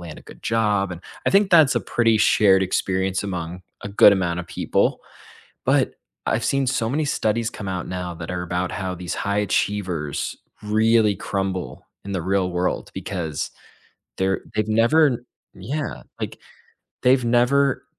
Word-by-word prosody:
land 85 -3 -9
a - - -14
good - - -15
job," 105 -4 +1
and 85 - -8 0.3
I - - +4
think 200 +1 +4
that's 160 -6 +6
a - - +1
pretty 115 -2 +2
shared 95 -3 +5
experience 95 0 0
among 90 -2 -5 0.2
a 100 - -5
good 100 0 +7
amount 90 -3 0
of 90 - -9
people. - - 0 0.6
But - - +2 0.3
I've 110 +1 0
seen 135 0 +1
so 125 -3 0
many 150 +4 0
studies 115 -3 0
come 100 - -7
out 90 -2 -3
now 90 -1 -4
that 80 +1 -6
are 90 -1 -3
about 90 +1 -2
how 95 -2 -3
these 90 0 -5
high 100 0 -1
achievers 95 -6 -1 0.3
really 110 0 +3
crumble 95 -1 -3 0.2
in 100 - -6
the 95 - -1
real 95 +1 +1
world 90 +1 -1
because 80 -6 -4 0.7
they're 95 -1 0
they've 110 0 0
never 120 +4 +3 0.3
Yeah, 150 +2 -4 0.2
like, - - -5 0.6
they've 125 0 +4
never 125 +3 +3
100 Hz, 160 wpm, -23 LUFS, 90-115 Hz, 0.7 s, good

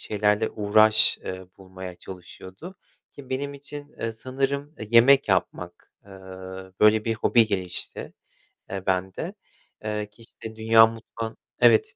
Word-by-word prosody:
şeylerle 105 +1 0
uğraş, 110 +1 +4
eee, 95 0 -7
bulmaya 95 -1 -9
çalışıyordu, 95 - -11 0.4
ki 135 -2 -13
benim 140 +2 -3
için, 145 +1 -10
eee, 115 0 -2
sanırım, 135 +5 -3
eee, 110 - -8
yemek 125 +2 +6
yapmak, 90 -1 -2
eee, - - -16 0.7
böyle 105 0 +5
bir 115 -1 0
hobi 115 0 +3
gelişti, 95 -4 -3 0.6
eee, 95 -1 -5
bende. 95 0 -2 0.5
Eee, 105 -1 -3
ki 105 +2 -22
işte 110 -1 -11
dünya 110 0 +6
mutfağın 115 0 -7 0.2
evet, 115 -2 +4
110 Hz, 130 wpm, -25 LUFS, 95-120 Hz, 0.7 s, yemek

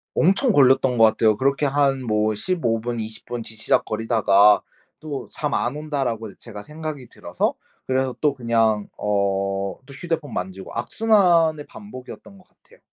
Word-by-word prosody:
엄청 195 - +3
걸렸던 130 -2 +4
것 115 - +5
같아요. 110 0 +3
그렇게 140 +2 +1
한 140 0 +2
뭐 110 -1 +1
15 120 - -1
분 120 0 -3
20 110 0 -7
분 120 -1 -5
뒤적거리다가 110 -3 +2 0.4
'또 150 -3 -6
잠 150 - -4
안 125 +4 -1
온다.'라고 135 -8 -3
제가 105 -3 -10
생각이 150 -3 -7
들어서 - - -2 0.3
그래서 130 -1 0
또 150 -2 +2
그냥 115 -4 +1
어 100 -1 0 0.4
또 140 - -13
휴대폰 160 0 -4
만지고 95 +1 -5
악순환의 170 - +2
반복이었던 195 +2 -11
것 185 - -21
같아요. 485 +1 -25
130 Hz, 295 characters per minute, -22 LUFS, 110-150 Hz, 0.4 s, 것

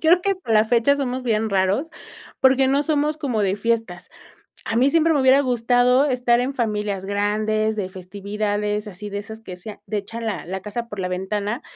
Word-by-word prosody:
creo 340 +3 +5
que 395 - 0
hasta 370 -12 -2
la 215 0 +5
fecha 240 +5 +3
somos 260 -2 -2
bien 220 -2 0
raros, 195 +9 +1 0.5
porque 265 0 +4
no 275 +2 +2
somos 300 0 0
como 270 -8 -2
de 195 0 +1
fiestas. 225 -5 -2 0.6
A 225 - -2
mí 260 +3 +4
siempre 330 +2 +3
me 285 - +2
hubiera 260 +1 +5
gustado 250 +1 +3
estar 245 -3 +2
en 255 +3 -1
familias 210 -5 -2
grandes, 215 +2 0
de 200 -3 -3
festividades, 205 +2 -3
así 205 +1 -8
de 200 - -4
esas 220 +2 -9
que 185 -5 -9
se 195 +4 -8
a 205 - -15
de 210 +1 -3
echan 225 +3 -6
la 200 -8 -3
la 190 +2 -5
casa 230 +3 -5
por 205 -3 -8
la 185 - -2
ventana, 205 +5 -2
220 Hz, 205 wpm, -22 LUFS, 205-260 Hz, 0.6 s, creo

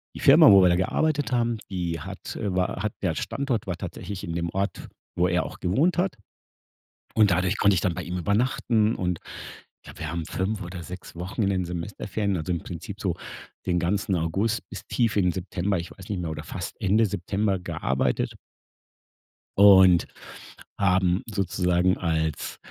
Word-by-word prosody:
die - - -7
Firma, - - +8
wo 100 -1 +8
wir 90 - +6
da 85 - +4
gearbeitet 145 +9 0
haben, 120 -1 +1
die 85 -4 -2
hat, - - -7
äh, 100 -3 -2
war 90 0 0
hat 110 -1 -2
der 85 -5 0
Standort 130 -8 -2
war 90 - -2
tatsächlich 95 +2 -6
in 85 - -4
dem 85 0 -2
Ort, 100 +3 -3 0.3
wo 90 +1 +3
er 90 0 +1
auch - - -9
gewohnt 140 - +1
hat. 185 +1 +1 1.0
Und 105 -3 +4
dadurch 90 +3 +1
konnte 100 -1 +4
ich - - +1
dann 90 - +1
bei 90 - -5
ihm 90 +1 -4
übernachten 110 +3 +1
und 90 -2 -2 0.7
ja, - - -10
wir 80 - -4
haben 85 -2 -3
5 100 +1 -2
oder 90 0 -7
6 90 0 -9
Wochen 90 +6 -4
in 100 - +2
den 95 -2 0
Semesterferien, 100 +3 -3
also 85 +3 -2
im 85 - -1
Prinzip 85 -2 -7
so - - 0 0.5
den 90 -1 +1
ganzen 95 +2 0
August 95 +8 -1
bis - - -8
tief 115 -4 +1
in 100 - +4
den 90 - +3
September, 95 +1 -2
ich 85 - -7
weiß 95 - -12
nicht 100 -3 -2
mehr, 80 - -3
oder 75 0 -6
fast 90 +3 -6
Ende 105 +2 +3
September 100 0 -1
gearbeitet. 65 -6 -1 1.2
Und 95 -3 +7 0.7
haben 95 -1 +2
sozusagen 90 -2 +1
als, 80 -3 -2
95 Hz, 180 wpm, -25 LUFS, 90-100 Hz, 1.2 s, Firma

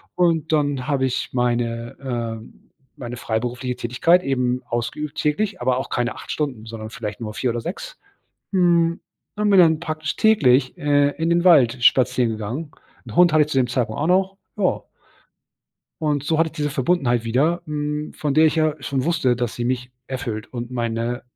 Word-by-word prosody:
Und 165 -2 +1
dann 145 -4 0
habe 135 -2 +1
ich 130 - -2
meine, 120 -1 -1
ähm 115 -4 -6 0.3
meine 120 -1 -6
freiberufliche 125 +2 -3
Tätigkeit 145 +10 +2
eben 125 -4 0
ausgeübt 120 +6 -3
täglich, 185 +6 -1
aber 130 -1 +1
auch 130 - -4
keine 120 0 -1
8 - - -11
Stunden, 135 -8 -3
sondern 110 -1 -7
vielleicht 105 -3 -6
nur 110 -3 -5
4 125 - -1
oder 120 0 -2
6. - - -7 0.6
Hm, 170 -2 +3 0.4
und 210 0 +1
bin 195 - +5
dann 160 -2 +5
praktisch 155 -2 -4
täglich, 135 - +3
äh, 145 -1 +3
in 160 +3 -2
den 170 +1 +2
Wald 130 -8 +5
spazieren 125 -1 +4
gegangen. 115 +8 -5 0.4
'N - - -9
Hund 175 -1 +5
hatte 155 -1 +5
ich 150 - -1
zu 135 - +1
dem 125 -2 +2
Zeitpunkt 125 +1 -2
auch 150 - 0
noch, 190 +1 +2 0.2
ja. - - 0 1.2
Und 150 -2 0
so 160 +1 +1
hatte 165 0 +2
ich - - -18
diese 150 -3 -1
Verbundenheit 130 -4 +1
wieder, 140 +10 +1
hm, 150 0 -3
von 145 -2 -2
der 160 +2 +6
ich 155 - +1
ja 155 -1 +2
schon 135 -1 -2
wusste, 160 -7 +1
dass 120 -2 -2
sie 120 - -3
mich 125 0 -2 0.2
erfüllt 120 -5 -5
und 120 0 -6
meine 120 0 -2
135 Hz, 185 wpm, -22 LUFS, 120-155 Hz, 1.2 s, der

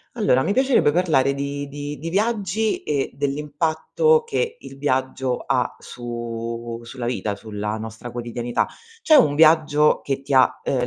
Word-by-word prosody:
Allora, 130 - +3
mi 200 - 0
piacerebbe 260 - +3
parlare 150 -5 +2
di 140 +1 -4
di 145 0 -6
di 160 +5 -5
viaggi 210 +2 0
e 140 -2 -1
dell'impatto 155 - +1
che 465 0 -2
il 135 - -11
viaggio 130 -2 0
ha - - 0
su 115 -1 -6
sulla 120 +1 -7
vita, 110 -4 -2
sulla 105 0 -4
nostra 110 +2 -7
quotidianità. 120 0 -2 0.4
C'è 315 - +5
un 220 - +5
viaggio 155 -1 +4
che 135 -1 -3
ti 140 - -5
ha, 130 -1 +4
uhm, 125 -2 0
140 Hz, 150 wpm, -22 LUFS, 120-165 Hz, 0.4 s, C'è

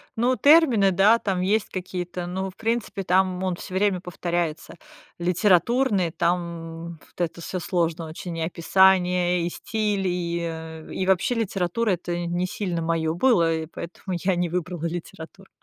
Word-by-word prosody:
ну, 245 +3 +2
термины, 280 -11 +5
да, 205 +6 +5
там 190 -3 -1
есть 205 +3 +1
какие-то, 180 -1 -5
ну, 190 +2 -3
в 185 - -15
принципе, 225 -3 -2
там 185 0 +1
он 185 -1 0
всё 185 +1 -8
время 190 -2 +1
повторяется. 175 -2 -3 0.4
Литературный 190 +3 +2
там 170 -1 -2
вот - - -10
это 170 0 -2
всё 185 +2 -4
сложно 170 -2 -1
очень: 165 +2 -7
и - - -3
описание, 180 +1 +3
и - - -1
стиль, 210 -3 -1
и, 170 -1 -1
э, 160 -1 -6
и 185 - -2
вообще 190 +6 +2
литература- 205 0 0
это 175 -1 -2
не 175 +2 -1
сильно 180 -4 -3
моё 165 -1 0
было, 175 -5 +3
и 160 0 -3
поэтому 180 +3 -6
я 185 -1 +2
не 175 -1 0
выбрала 175 -1 -3
литературу. 175 +2 -8
180 Hz, 155 wpm, -24 LUFS, 170-195 Hz, 0.4 s, термины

